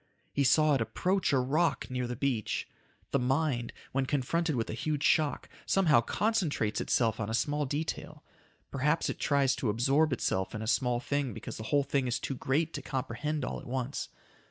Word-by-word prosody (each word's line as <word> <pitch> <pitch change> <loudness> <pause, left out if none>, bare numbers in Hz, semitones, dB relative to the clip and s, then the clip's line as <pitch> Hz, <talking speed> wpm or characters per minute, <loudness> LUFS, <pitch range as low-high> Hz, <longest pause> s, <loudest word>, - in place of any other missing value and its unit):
He 140 - +2
saw 150 +3 +5
it 135 - +2
approach 185 - 0
a 140 - +3
rock 140 +3 +1
near 125 -1 -1
the 125 - -3
beach. 125 -4 -1 0.4
The 140 - +2
mind, 130 -1 0 0.2
when 135 0 0
confronted 150 +4 0
with 115 -2 -1
a - - -4
huge 150 +5 -2
shock, 155 -2 +2 0.2
somehow 165 -11 +4
concentrates 165 - 0
itself 115 -3 +1
on 105 -2 -2
a 110 - 0
small 145 +4 0
detail. 150 +4 -4 0.5
Perhaps 150 +4 +1
it - - -8
tries 140 -2 +2
to 120 - -1
absorb 135 +8 +3
itself 95 -6 -1
in 105 - -4
a - - -4
small 120 +1 +1
thing 140 -3 -2
because - - -7
the 110 - -6
whole 145 -1 +3
thing 135 -1 0
is 120 - 0
too - - -3
great 150 +5 0
to - - -4
comprehend 140 +2 -3
all - - -4
at - - -11
once. 130 +2 -3
135 Hz, 190 wpm, -30 LUFS, 120-150 Hz, 0.5 s, saw